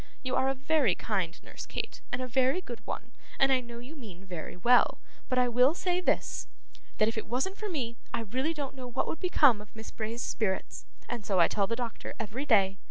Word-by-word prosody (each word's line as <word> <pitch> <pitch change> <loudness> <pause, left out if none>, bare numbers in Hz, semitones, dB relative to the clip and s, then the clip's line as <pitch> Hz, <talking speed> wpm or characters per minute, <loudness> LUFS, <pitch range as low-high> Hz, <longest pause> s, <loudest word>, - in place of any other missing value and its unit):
You 260 -1 -1
are 265 - +3
a 270 - 0
very 270 - +3
kind 190 -6 -1
nurse, - - -8
Kate, - - -4
and 245 +1 -1
a - - -3
very 260 +6 +3
good 240 -10 -7
one, 235 +4 -5 0.3
and 270 0 +4
I 260 - +5
know 235 -1 -9
you 250 +7 -9
mean 195 - -10
very 175 -2 -6
well; 240 +7 +5 0.3
but 255 - +1
I 250 0 +5
will 250 +6 +4
say 360 0 0
this - - 0 0.5
that 215 - +4
if 225 0 0
it - - -8
wasn't 265 - 0
for 425 - -4
me, 240 -9 -3
I - - -1
really 260 +9 -1
don't 285 -3 -4
know 260 -2 -7
what 245 +1 -1
would - - -3
become 290 - +5
of 210 +1 -15
Miss 220 0 -8
Bray's 225 +2 -3
spirits, 190 -4 -2 0.2
and 235 -3 -4
so 195 -2 +1
I 170 - +7
tell 200 -2 +1
the 230 - 0
doctor 235 -2 -5
every 230 +6 -3
day. 195 -5 +4
240 Hz, 230 wpm, -30 LUFS, 215-270 Hz, 0.5 s, I